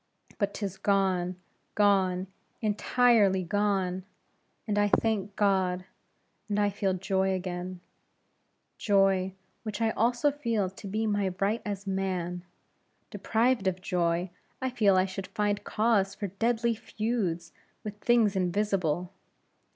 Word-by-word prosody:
But 200 -2 0
'tis 195 -3 -4
gone 190 -3 +1 0.4
gone 190 -3 +3 0.3
entirely 215 -2 +3
gone; 190 -1 0 0.6
and 205 -1 +1
I 205 - +4
thank 205 -2 0
God, 185 -3 +1 0.6
and 205 0 0
I 205 0 +2
feel 195 -1 0
joy 190 0 0
again; 180 0 -5 1.0
joy, 195 -2 +2 0.3
which 215 -2 -5
I 225 -1 +2
also 240 +6 +2
feel 230 -9 -1
to 195 +1 -10
be 215 +3 -1
my 205 -3 0
right 205 +4 +1
as 200 -1 -4
man; 185 -2 -2 0.7
deprived 230 -2 +1
of 185 0 0
joy, 175 -1 0 0.3
I 260 -1 -2
feel 205 -5 +3
I 185 - +4
should 190 0 -6
find 205 -1 -1
cause 210 -3 +1
for 200 - -4
deadly 230 +4 +1
feuds 210 -7 -2 0.3
with 210 -1 -7
things 225 -3 +3
invisible. 180 -2 0
195 Hz, 125 wpm, -29 LUFS, 185-215 Hz, 1.0 s, I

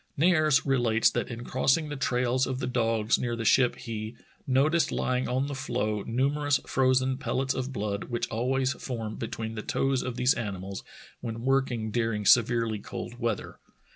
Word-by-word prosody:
Nares 155 -3 +4
relates 115 -5 +3
that - - -2
in 120 -1 -6
crossing 135 +5 +1
the 145 - -4
trails 125 -1 +1
of 130 -1 -2
the 130 - -3
dogs 115 -3 +1
near 120 -1 -1
the 115 -1 -4
ship 125 +2 +4
he 110 -2 -6 0.3
"noticed, 150 +6 +3
lying 130 0 -1
on 130 +2 0
the 145 - -4
floe, 105 -6 -2
numer 140 +5 0
ous 145 -2 +4
frozen 130 0 +2
pellets 130 0 -1
of 130 +1 -3
blood 105 -4 -3
which 120 -2 -2
always 130 +3 0
form 115 -4 -5
between 110 0 -4
the 110 - -4
toes 135 +3 0
of 125 -2 -4
these 125 +1 +3
animals 100 -3 -5 0.4
when 115 -1 -5
working 130 -4 0
during 115 -2 -1
severely 115 -1 +4
cold 120 +4 -7
weather. 115 -3 -3
125 Hz, 170 wpm, -28 LUFS, 115-135 Hz, 0.4 s, Nares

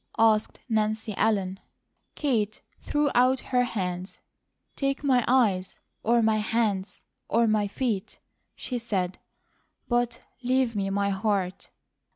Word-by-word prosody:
asked 220 -1 +3
Nancy 220 -1 0
Ellen. 195 -3 +1 0.6
Kate 220 -8 0 0.2
threw 295 -1 0
out 255 +2 +4
her 250 -1 +1
hands. 185 -5 -4 0.6
"Take 275 +1 -1
my 255 -4 +3
eyes, 210 -8 +2 0.2
or 235 +1 +3
my 220 0 +3
hands, 210 -3 -1 0.3
or 230 +1 +3
my 215 -2 +2
feet," 210 -2 -2 0.4
she 250 -2 -4
said; 190 -6 -2 0.7
"but 240 -1 0 0.2
leave 255 -2 +1
me 195 -1 0
my 200 0 +1
heart." 195 -2 -1
220 Hz, 120 wpm, -27 LUFS, 200-245 Hz, 0.7 s, out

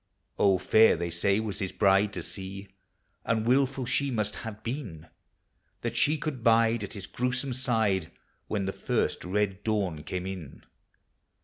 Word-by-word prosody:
Oh, 100 -2 +5
fair 110 +5 +5
they 85 0 -3
say, 100 +4 +2
was 110 -2 -3
his 95 -2 -2
bride 100 0 +3
to - - -4
see, 95 0 -7 0.5
And 110 -1 0
wilful 135 +1 +2
she 140 +3 0
must 105 -4 -1
have 110 -1 -7
been, 115 - -5 0.8
That 120 0 -3
she 150 +6 +3
could 145 -7 -4
bide 115 -1 +4
at 100 - -6
his 100 -4 -6
gruesome 125 +3 -1
side 110 -9 +1 0.4
When 100 -2 -1
the 95 - -2
first - - -1
red 100 +1 -1
dawn 100 -8 -1
came 90 +3 -4
in. 95 -7 -7
105 Hz, 155 wpm, -28 LUFS, 95-120 Hz, 0.8 s, Oh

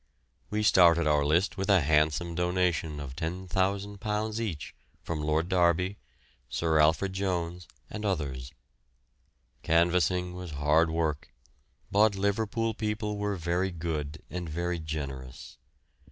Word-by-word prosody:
We 105 0 -1
started 85 -5 +5
our 75 -1 +3
list 85 +8 +1
with 95 +2 -2
a 95 -3 +6
handsome 75 +3 +2
donation 90 -3 0
of 70 -2 -7
£10,000 100 +5 -2
each 95 -11 -4 0.3
from 80 -2 -3
Lord 75 +2 0
Derby, 90 +1 +2 0.5
Sir 80 +4 +1
Alfred 80 +5 +3
Jones, 90 -3 -2 0.2
and 110 - -7
others. 70 -10 -2 1.1
Canvassing 90 +2 +2
was 90 -3 -7
hard 75 +3 +3
work, 80 -3 -2 0.6
but 105 0 +4
Liverpool 110 +3 0
people 105 -1 -3
were 105 -1 -1
very 90 +2 0
good 80 -4 -4
and 90 -2 -5
very 85 +2 -2
generous. 70 -5 -6
85 Hz, 120 wpm, -29 LUFS, 80-95 Hz, 1.1 s, a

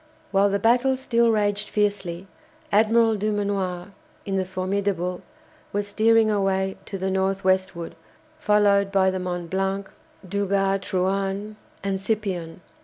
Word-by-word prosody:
While 200 0 +4
the 200 - +1
battle 245 +5 +3
still 235 -3 +2
raged 205 -1 0
fiercely, 200 -4 -1 0.5
Admiral 225 +2 +4
Dumanoir, 200 -3 -2 0.4
in 195 - -2
the 190 -1 0
"Formidable," 185 -1 -2 0.5
was 205 0 -1
steering 225 +1 +4
away 195 -1 0
to 195 - -5
the 190 0 -2
north 190 +1 0
westward, 185 -2 0 0.5
followed 205 -5 +3
by 190 -1 +3
the 185 - -3
"Mont 175 -2 -4
Blanc," 195 +1 -1 0.4
"Duguay 195 0 +1
Trouin," 195 +2 -2 0.3
and 195 -1 -1
"Scipion." 190 -6 -3
195 Hz, 125 wpm, -24 LUFS, 190-210 Hz, 0.5 s, While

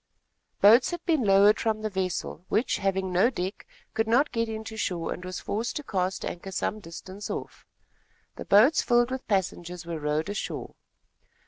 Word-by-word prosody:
Boats 225 +5 +7
had 345 -1 -6
been 320 -5 +2
lowered 200 +1 +5
from 220 -1 -1
the 215 - -1
vessel, 185 -3 -3
which, 220 +5 +1
having 190 -1 -1
no 190 +7 +4
deck, 190 -5 -5 0.3
could 225 0 0
not 250 +6 +3
get 230 -1 -1
into 220 0 -6
shore 175 -6 -2
and 180 - -9
was 185 0 -5
forced 225 +3 -3
to 295 - -3
cast 190 -6 -2
anchor 185 +3 -6
some 200 +3 -2
distance 190 +2 -9
off. - - -6 0.7
The - - -7
boats, 240 +10 +5
filled 240 0 +2
with 260 0 -5
passengers, 180 -3 -2
were 165 -2 -4
rowed 150 +1 -1
ashore. 205 - -4
200 Hz, 175 wpm, -27 LUFS, 185-225 Hz, 0.7 s, Boats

